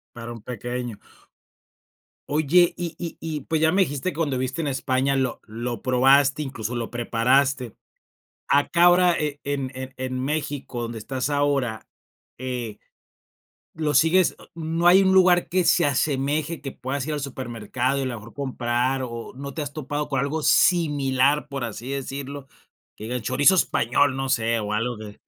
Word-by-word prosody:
Para 120 0 -7
un 115 -2 -9
pequeño. 120 -1 -5 1.3
Oye, 155 +4 +3
Y 175 -2 -4
y 170 -2 -5
y 160 -2 -4
pues, 160 +1 -1
ya 160 - +4
me 195 - +4
dijiste 145 +2 -2
cuando 150 -5 -1
viviste 130 +5 -3
en - - -2
España 135 0 0
lo 130 -3 -1
lo 115 0 -5
probaste, 135 +3 +4
incluso 120 -4 -4
lo 115 -1 -3
preparaste. 125 +1 +1 0.7
Acá 170 +5 +3
ahora 175 0 +5
en 145 -2 -3
en 130 0 -7
en 130 0 -3
México, 145 -4 -3
donde 115 -1 -5
estás 130 +5 -3
ahora, 140 -6 0 0.5
eh, 125 -4 -4 1.0
lo 155 -2 -1
sigues 165 +5 +4
a - - -15
no 165 +1 -2
hay 190 +2 +7
un 190 0 +3
lugar 180 -2 +5
que 185 0 +1
se 175 - +4
asemeje, 145 +3 0
que 135 - -6
puedas 135 +2 -4
ir 155 - -2
al 150 - -2
supermercado 130 0 -3
y - - -1
a 130 - -2
lo 125 - -3
mejor 110 +2 -12
comprar, 130 -1 -1
o, 115 -1 -7
no 140 +1 -6
te 155 - -3
has 145 0 -6
topado 145 0 -4
con 140 - -1
algo 150 +3 -2
similar, 145 -5 +3
por 135 -2 -5
así 115 +3 -6
decirlo, 140 0 -5 0.5
que 110 - -9
diga, 120 - -4
el 120 - -4
chorizo 140 - +4
español, 130 -2 +2
no 135 0 -2
sé, 115 -3 +1
o 105 0 -4
algo 115 +1 -1
que. 105 -1 -10
135 Hz, 170 wpm, -24 LUFS, 125-150 Hz, 1.3 s, hay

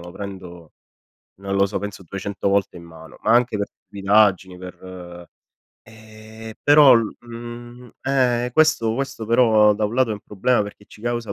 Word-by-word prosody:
lo 85 0 -11
prendo, 90 -5 -10 0.7
non 100 0 -4
lo 100 0 +3
so, 100 - -4
penso 100 -2 -7
200 100 +2 -4
volte 100 -2 0
in 85 - -12
mano, 80 -1 -14
ma 110 - +1
anche 120 -2 +3
per 100 - -2 0.2
stupidaggini 100 -2 +2
per, 90 0 -10
uhm 90 -1 -10 0.6
e, 110 0 -13
però 145 -2 +7
l 115 -2 0
mhmm, 120 +1 -10
ehm, 125 -2 +1
questo 155 -6 +2
questo 135 -2 -4
però, 110 -2 +4
uhm, 105 - +1
da 105 - -1
un 105 - -3
lato 130 -2 +2
è - - -1
un - - -9
problema 105 +4 0
perché 105 0 -12
ci - - -16
causa 120 0 -3
110 Hz, 180 wpm, -21 LUFS, 100-120 Hz, 0.7 s, però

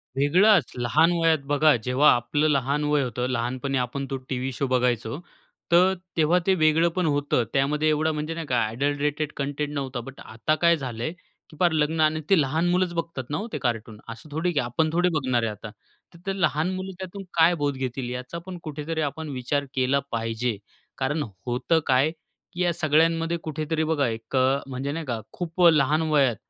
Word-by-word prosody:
वेगळाच, 175 - +4
लहान 150 +8 +3
वयात 165 -1 +4
बघा 145 +1 +4
जेव्हा 130 +4 +4
आपलं 145 +6 0
लहान 140 +1 +1
वय 150 -1 +2
होतं, 125 0 -2
लहानपणी 130 +3 -2
आपण 130 +2 -2
तो 135 - -1
टीव्ही 130 0 -2
शो 135 +2 -2
बघायचो, 125 +2 0 0.5
तर 180 +2 +5 0.2
तेव्हा 165 +3 +4
ते 190 - +5
वेगळपण 165 +2 +2
होतं. 145 -4 +1
त्यामध्ये 150 +3 +2
एवढा 155 +1 +1
म्हणजे 155 +1 -3
नाही 165 -1 -5
का 125 -3 +1
ॲडल्टरेटेड 145 +5 -1
कंटेंट 145 +1 -2
नव्हता. 135 -3 -3
बट 135 +3 -10
आता 115 +8 -1
काय 170 0 +5
झालंय, 125 0 -4 0.4
की 155 - -15
फार 175 -2 +4
लग्न 155 +1 0
आणि 155 0 +2
ते 195 -3 +5
लहान 155 +5 0
मुलंच 180 0 +1
बघतात 165 -5 -3
ना 145 - -1
हो 215 - -4
ते - - -1
कार्टून, 115 -3 -3
असं 115 +7 -9
थोडी, 165 +4 0
की 150 - 0
आपण 125 +7 0
थोडी 175 +1 +3
बघणार 130 -6 +1
आहे 115 - 0
आता, 105 +1 -9 0.4
तर 170 - -15
ते 195 0 -2
लहान 155 +4 +1
मुलं 185 +1 -5
त्यातून 190 +1 -7
काय 165 +1 +5
बोध 145 -1 0
घेतील 130 -1 -3
याचा 125 +6 -5
पण 185 -1 -7
कुठेतरी 155 +1 -4
आपण 155 +1 -3
विचार 140 +2 -2
केला 130 +1 +2
पाहिजे 115 0 -2 0.4
कारण 145 +3 -1 0.2
होतं 125 +7 +1
काय, 135 +3 +3 0.4
की 175 - -4
या 175 -1 +2
सगळ्यांमध्ये 165 +2 +2
कुठेतरी 155 +1 -2
बघा 155 -4 +1
एक 115 +2 -5
अ, 130 +1 +3
म्हणजे 135 +1 -4
नाही 160 +2 -4
का 120 -4 -3
खूप 175 0 -4
लहान 150 +1 +2
वयात 140 -6 +3
145 Hz, 190 wpm, -25 LUFS, 130-160 Hz, 0.5 s, तर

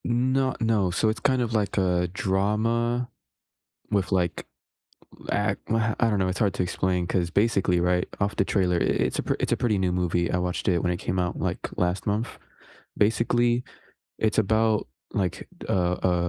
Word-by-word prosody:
No, 130 +2 +1
no, 110 -5 +2
so 105 +5 +1
it's 110 - -2
kind 130 -2 +2
of 120 -1 -2
like 105 -3 0
a 90 -2 +2
drama 115 +6 0 0.8
with, 100 -3 0
like, 90 -3 0 0.7
l - - -15
act - - 0
uh, 110 -1 +1
I 115 - +3
don't 105 -2 +1
know, 95 - +1
it's 95 - -2
hard 100 -4 +2
to - - -1
explain 90 0 -1
'cause, 90 -2 0
basically, 100 -4 +2
right, 90 +1 +1
off 100 0 0
the 100 - +1
trailer, 90 -3 +1
i - - +1 0.2
it's - - -5
a - - 0
pr - - 0
it's - - -1
a - - +2
pretty 110 -5 +1
new 95 -1 +1
movie, 90 -1 0
I 90 - +1
watched 90 0 -2
it 90 -3 +2
when 90 - +1
it - - -4
came 95 - -2
out, 90 0 -2
like, - - -2 0.2
last 90 +1 0
month. 105 +3 0 0.7
Basically, 120 +3 +2 0.6
it's 110 -1 0
about, 110 - +2 0.2
like, 95 -1 -2 0.2
a 95 - +2 0.3
a - - +2
100 Hz, 190 wpm, -26 LUFS, 90-115 Hz, 0.8 s, I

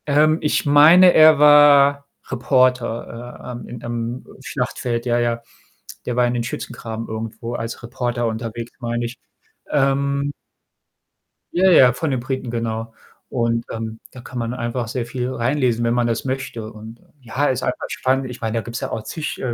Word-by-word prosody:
Ähm, 155 +2 +3
ich 150 - 0
meine, 160 +6 +7
er 155 -1 +7
war 145 -1 +6 0.2
Reporter, 125 -2 0
äh, - - -6
ähm, 120 - -8
im, 120 -1 -9
ähm, 120 +1 -4 0.2
Schlachtfeld. 120 -1 -3
Ja, 120 -1 +1
ja. 120 -1 0 0.6
Der 125 - -2
war 125 0 +3
in 120 - 0
den 120 -1 -1
Schützengraben 115 -1 -6
irgendwo 110 +1 -5
als 115 +1 -5
Reporter 120 0 -2
unterwegs, 115 +1 -5
meine 120 0 -2
ich. 120 +1 -7 0.5
Ähm 140 0 +1 1.2
Ja, 185 +2 +4
ja, 130 -8 +7
von 145 +5 -2
den 130 -2 -1
Briten, 130 0 -4
genau. 115 -1 -3 0.3
Und, 115 -1 -1
ähm, 110 0 -5
da 125 - -11
kann 125 0 -7
man 115 +1 -2
einfach 120 -1 -3
sehr 120 +1 -3
viel 125 +1 -3
reinlesen, 125 -1 0
wenn 115 0 +1
man 120 -1 +1
das 115 -1 -1
möchte. 130 -4 -4
Und, 110 +2 -12 0.2
ja, 130 +3 -2
ist 130 -1 0
einfach 125 - -3
spannend. 130 0 0
Ich 125 - -8
meine, 110 0 -2
da - - 0
gibt's 120 +1 -6
ja - - -4
auch 110 - -4
zig, 155 +4 -5
äh, 125 -2 -2
120 Hz, 175 wpm, -21 LUFS, 115-135 Hz, 1.2 s, meine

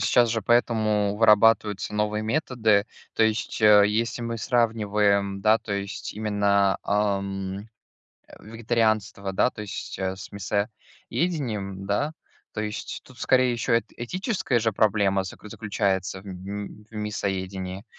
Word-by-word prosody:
сейчас 120 +1 +3
же 115 - 0
поэтому 110 -3 +2
вырабатываются 105 -2 +4
новые 105 0 0
методы. 110 -4 +1 0.3
То - - +2
есть, 110 +1 0
э, 105 -1 +7
если 115 +3 -1
мы 115 0 -3
сравниваем, 105 -4 +1
да, 110 +1 +5
то 110 -2 -6
есть 100 0 -5
именно, 100 -2 +2
а, 100 -1 +1
м, 95 +1 -5 0.6
э, - - -15
вегетарианство, 110 -3 -1
да, 125 - +3
то 105 - -10
есть, 100 -4 -6
э, 95 0 -2
с 95 - -10
мясоедением, 105 - -3
да. 140 +10 0 0.4
То 105 - -4
есть 105 0 -5
тут, 130 -1 -17
скорее, 130 -1 +3
еще 115 0 +1
эт - - -10
этическая 185 - -1
же 115 -1 0
проблема 100 -2 +2
заклю 105 +2 -9
заключается 100 -3 -1
в - - -17
м 100 +2 -6
м 105 0 -13 0.2
мясоедении. 95 -2 -4
105 Hz, 140 wpm, -25 LUFS, 100-115 Hz, 0.6 s, э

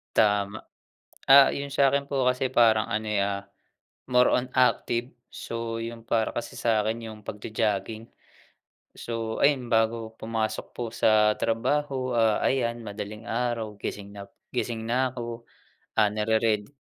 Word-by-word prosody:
Tama. 105 0 +2 0.7
Ah, 140 0 +9
yung 140 0 -4
sa 140 -1 +3
akin 140 0 0
po 135 -2 0
kasi 125 +1 +1
parang 110 -3 +4
ano 110 +1 -2
eh, 105 -2 +1
ah, 100 0 -1 0.7
more 125 0 +4
on 125 0 +1
active. 125 -1 +1 0.2
So, 115 0 -5
yung 115 0 -7
para 115 -1 +1
kasi 120 - -4
sa 110 -2 +2
akin 115 +1 -3
yung 110 - -10
pagjo-jogging. 110 +1 -2 0.9
So, 115 -1 -4
ayun, 135 -4 +2
bago 115 0 +1
pumasok 110 -1 -2
po 120 - -3
sa 105 -2 +3
trabaho, 130 +3 0
ah, 115 -2 +2
ayan, 120 -3 0
madaling 105 +1 -7
araw, 115 -3 -2
gising 100 0 -6
nap 100 -1 -11 0.2
gising 120 -2 -2
na 125 +2 +1
ako. 120 -1 -6 0.6
Ah, 105 - +5
narered 110 +1 0
115 Hz, 145 wpm, -26 LUFS, 110-125 Hz, 0.9 s, Ah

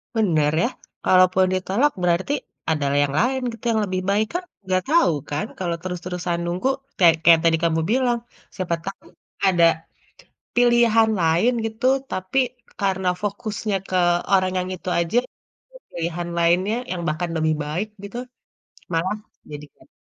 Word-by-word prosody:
Benar 160 -9 +2
ya. - - +2 0.4
Kalaupun 185 0 +5
ditolak, 200 +10 +1
berarti 175 +9 +1 0.4
ada 150 -3 0 0.2
yang 140 - -2
lain 260 +3 +1
gitu, 225 - -12
yang 220 - +1
lebih 185 0 -2
baik. 210 +2 +2
Kan 360 - -1 0.2
nggak 185 -1 0
tahu 335 - +4 0.2
kan 150 +8 -2
kalau 175 -2 -2
terus-terusan 180 -1 -3
nunggu, 180 +9 0 0.3
kayak 170 -3 +6
kayak 165 -1 +7
tadi 165 -1 +4
kamu 165 -1 +2
bilang, 245 -1 +2 0.4
siapa 180 -3 -1
tahu 195 - -7 0.4
ada 175 -3 +3 0.9
pilihan 240 -2 +4
lain 165 +9 +3
gitu, 220 +2 -4 0.3
tapi 185 +8 -1 0.4
karena 190 -2 0
fokusnya 210 0 -3
ke 185 - -3 0.4
orang 185 -1 +3
yang 180 - -3
itu 185 - -6
aja, 170 +7 0 0.6
jadi - - -13
pilihan 170 +1 -3
lainnya 180 +5 +2 0.2
yang 180 -2 -3
bahkan 165 +3 -2
lebih 155 0 +1
baik 170 +8 -3
gitu 200 +4 -7 0.8
malah 180 +5 0 0.4
jadi 145 0 -7
kayak - - -23
185 Hz, 145 wpm, -22 LUFS, 170-220 Hz, 0.9 s, kayak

